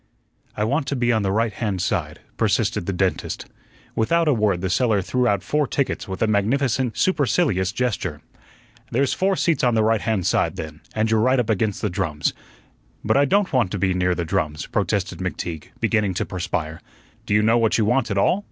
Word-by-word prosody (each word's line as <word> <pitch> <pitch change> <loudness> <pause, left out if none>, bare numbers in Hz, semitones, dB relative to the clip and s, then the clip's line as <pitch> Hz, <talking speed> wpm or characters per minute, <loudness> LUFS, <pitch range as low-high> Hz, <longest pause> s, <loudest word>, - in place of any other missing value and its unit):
"I 105 - 0
want 135 +6 0
to 140 - -1
be 120 -1 +1
on 110 - +1
the 95 -1 0
right 110 +2 +1
hand 105 -5 -2
side," 85 -5 -2
persisted - - 0
the - - +1
dentist. 95 0 -2 0.5
Without 165 +9 +2
a 150 - +5
word 105 -6 +1
the 95 - -1
seller 110 0 +2
threw 125 +6 0
out 100 -5 +1
four 150 +6 0
tickets 140 - -2
with 95 +2 -3
a - - +2
magnificent, 120 +4 +1
supercilious 125 - +1
gesture. 105 - -2 0.7
"There's 135 +3 +1
four 190 +1 +1
seats 165 -5 +1
on 120 -2 +3
the 110 - +3
right 110 -1 +2
hand 110 -6 -1
side, - - +1
then, 80 -1 -7
and 110 0 +1
you're 110 - +3
right 130 +4 +3
up 115 -2 +1
against 105 -1 -1
the 105 - +1
drums." 80 -4 -1 0.7
"But - - +2
I 140 +1 +5
don't 200 +4 +1
want 120 -7 +2
to - - -1
be 95 0 +1
near 90 0 +1
the 85 - -2
drums," 75 -1 -2
protested - - -1
McTeague, 80 -4 -4
beginning 105 -4 +1
to - - -1
perspire. 85 -3 -4 0.5
"Do 105 - +2
you 105 - +4
know 115 +2 +4
what 115 -1 +2
you 110 - +2
want 120 +2 +1
at 100 - -1
all?" 175 - +3
110 Hz, 205 wpm, -22 LUFS, 95-125 Hz, 0.7 s, a